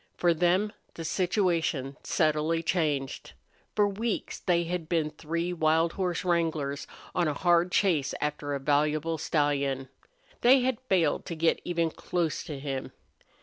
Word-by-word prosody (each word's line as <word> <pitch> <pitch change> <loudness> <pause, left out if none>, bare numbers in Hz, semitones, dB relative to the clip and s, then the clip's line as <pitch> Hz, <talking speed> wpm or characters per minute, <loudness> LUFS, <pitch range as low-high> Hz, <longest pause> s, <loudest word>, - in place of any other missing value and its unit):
For 175 -1 +3
them 180 +6 +2 0.2
the 165 - -6
situation 170 -7 0
subtly 155 +1 +1
changed. 150 -6 -1 0.4
For 210 -1 +4
weeks 215 +3 -3
they 170 -1 +2
had 170 -1 -4
been 160 -3 +1
three 170 +3 -3
wild 160 0 +2
horse 180 -2 -2
wranglers 160 -5 0 0.3
on 175 -2 +1
a 150 - -1
hard 175 +1 +3
chase 170 -10 +2
after 145 -1 -2
a - - -3
valuable 150 +3 +1
stallion. 140 -4 0 0.5
They 255 +2 +6
had 250 -2 0
failed 170 -6 +2
to 170 - -4
get 165 +1 +2
even 170 -2 0
close 170 -2 -2
to 150 - -5
him. 135 -1 -4
165 Hz, 145 wpm, -28 LUFS, 150-180 Hz, 0.5 s, They